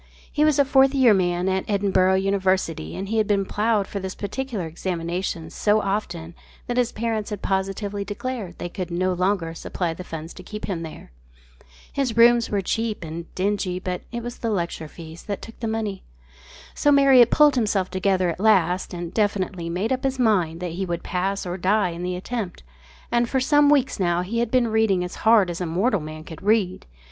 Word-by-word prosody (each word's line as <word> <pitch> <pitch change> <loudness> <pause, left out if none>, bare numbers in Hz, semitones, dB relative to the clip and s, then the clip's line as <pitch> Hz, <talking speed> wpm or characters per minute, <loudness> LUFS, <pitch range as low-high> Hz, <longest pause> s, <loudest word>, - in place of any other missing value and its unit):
He 300 - +2
was 305 -2 +4
a 280 - +5
"Fourth 270 0 +4
Year 255 -5 +6
Man" 180 -1 +1
at 190 0 +1
Edinburgh 190 -2 +2
University 190 - 0
and 195 - -4
he 225 0 +1
had 215 - +1
been 200 -1 +2
ploughed 210 0 +1
for 200 - -5
this 190 -1 -5
particular 220 -2 -4
examination 170 0 -3
so 210 0 +2
often 175 -5 -3 0.3
that 245 - -3
his 245 -1 +2
parents 220 -1 -2
had 210 -2 -6
positively 195 +1 -1
declared 205 -2 -5
they - - -4
could 180 0 -5
no 185 +2 0
longer 180 -2 0
supply 165 0 -3
the 180 - -8
funds 165 -1 -7
to - - -11
keep 210 +3 -7
him 180 -5 -3
there. 160 - -9 0.8
His 260 -5 -1
rooms 235 0 +6
were 200 -1 0
cheap 225 0 -2
and 165 +1 -7
dingy, 190 -1 -1
but 180 -1 -4
it 235 0 -4
was 240 0 -6
the 230 - -2
lecture 170 -5 -2
fees 160 +2 -11
that 200 -2 -3
took 225 - -12
the 230 - -3
money. 220 -3 -2 0.7
So 290 - +2
Marriott 270 -4 +7
pulled 300 -1 +5
himself 210 -6 0
together 185 -1 +1
at 165 - -8
last 190 -4 +2
and 175 0 -6
definitely 195 -5 -1
made 185 +7 -2
up 260 +1 -3
his 270 -1 0
mind 180 -9 +1
that 180 -2 -3
he 180 +4 -3
would 175 -2 -3
pass 195 +2 -2
or 180 0 -3
die 195 +1 +2
in 170 0 -6
the 180 0 -2
attempt, 195 0 -5 0.5
and 235 0 +2
for 265 - +1
some 290 +2 +4
weeks 275 -6 +2
now 175 -1 +1
he 225 +6 -2
had 235 - 0
been 245 -1 +2
reading 220 -5 +2
as 180 - -5 0.2
hard 205 -6 +5
as 175 - -6
mortal 185 +6 +1
man 155 +1 -8
can 160 -1 -10
read. 200 - +1
195 Hz, 200 wpm, -23 LUFS, 180-225 Hz, 0.8 s, Marriott